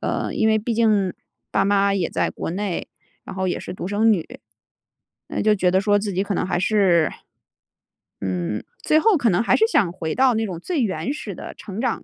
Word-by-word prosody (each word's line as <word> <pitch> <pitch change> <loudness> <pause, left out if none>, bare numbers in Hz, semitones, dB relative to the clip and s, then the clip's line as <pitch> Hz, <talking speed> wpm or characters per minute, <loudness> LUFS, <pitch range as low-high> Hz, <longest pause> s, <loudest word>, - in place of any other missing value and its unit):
呃， - - -2
因 220 - +2
为 220 0 +3
毕 230 +2 -2
竟 210 -5 +2 0.4
爸 - - +2
妈 200 0 +3
也 185 -4 0
在 - - -1
国 - - -5
内， 190 0 -3 0.4
然 - - -8
后 190 0 -1
也 - - -2
是 - - -7
独 180 - -5
生 215 +2 +3
女。 170 -6 -4 0.9
那 - - -3
就 215 -1 +4
觉 180 -2 +2
得 190 +1 +3
说 205 0 +3
自 205 -1 -3
己 190 +2 0
可 200 -1 -2
能 - - 0
还 175 - 0
是 185 -6 +3 1.1
嗯， 95 +2 -2 0.2
最 310 - +4
后 435 +2 +4
可 245 -7 +2
能 175 +4 +2
还 - - +3
是 445 - +4
想 195 - +2
回 160 -4 -3
到 260 -1 +4
那 220 0 0
种 180 -4 -5
最 320 - -2
原 225 +5 -1
始 300 - -6
的 - - -8
成 205 0 -8
长 250 -2 -1
200 Hz, 235 characters per minute, -22 LUFS, 180-225 Hz, 1.1 s, 就